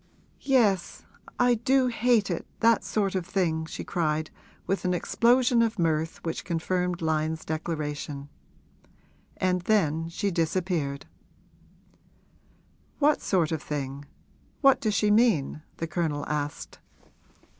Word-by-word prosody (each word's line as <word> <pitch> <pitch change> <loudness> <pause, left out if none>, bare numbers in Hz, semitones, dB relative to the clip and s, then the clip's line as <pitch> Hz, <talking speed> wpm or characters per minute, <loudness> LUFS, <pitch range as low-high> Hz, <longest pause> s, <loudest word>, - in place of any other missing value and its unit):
'Yes, 220 -10 +1 0.3
I 245 0 +4
do 255 +3 +2
hate 235 -4 +2
it 170 - -4
that 230 -3 +4
sort 195 0 -1
of 185 -2 -1
thing!' 165 -4 -1
she - - -6
cried 155 -2 -1 0.3
with 195 - -1
an 180 -1 +1
explosion 240 +6 +3
of 230 -1 0
mirth 160 -2 -1
which 165 - -3
confirmed 180 +1 -1
Lyon's 160 0 -1
declaration. 150 -3 -4 1.1
And 180 -1 +1
then 165 -5 +1
she 200 +4 -2
disappeared. 165 -4 -1 1.9
'What 295 0 +3
sort 175 -5 +1
of 160 -2 -2
thing 140 -1 -5 0.6
what 275 -2 +5
does 215 -2 0
she 210 0 +2
mean?' 205 - +2 0.2
the 165 - -2
Colonel 155 -3 -2
asked. 145 -1 -4
175 Hz, 120 wpm, -27 LUFS, 155-215 Hz, 1.9 s, what